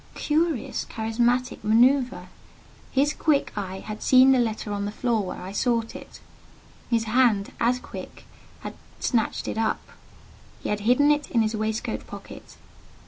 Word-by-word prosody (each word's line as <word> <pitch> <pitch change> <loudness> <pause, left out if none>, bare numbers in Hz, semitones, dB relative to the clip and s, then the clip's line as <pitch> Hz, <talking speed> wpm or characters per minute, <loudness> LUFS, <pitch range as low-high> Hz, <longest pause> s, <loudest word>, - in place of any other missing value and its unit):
Curious, 315 -3 0
characteristic 240 +3 -1
manoeuvre! 235 -3 +3 0.6
His 285 +3 +2
quick 300 -3 +1
eye 190 -2 -5
had 215 0 -7
seen 260 +1 +6
the 260 - +4
letter 220 -3 -2
on 200 0 -2
the 205 - -3
floor 235 0 0
where 185 - -6
I 185 - -6
sought 230 +2 0
it; - - -11 0.7
his 230 -2 +2
hand, 225 -3 +2
as 240 +2 +2
quick, - - -10 0.4
had - - -6 0.3
snatched 230 -4 0
it - - -3
up. 220 -1 -1 0.7
He - - -3
had 210 - 0
hidden 285 +4 +5
it 295 -1 0
in 230 -2 +2
his 220 +1 -1
waistcoat 215 +1 -3
pocket. - - -11
230 Hz, 150 wpm, -25 LUFS, 215-255 Hz, 0.7 s, seen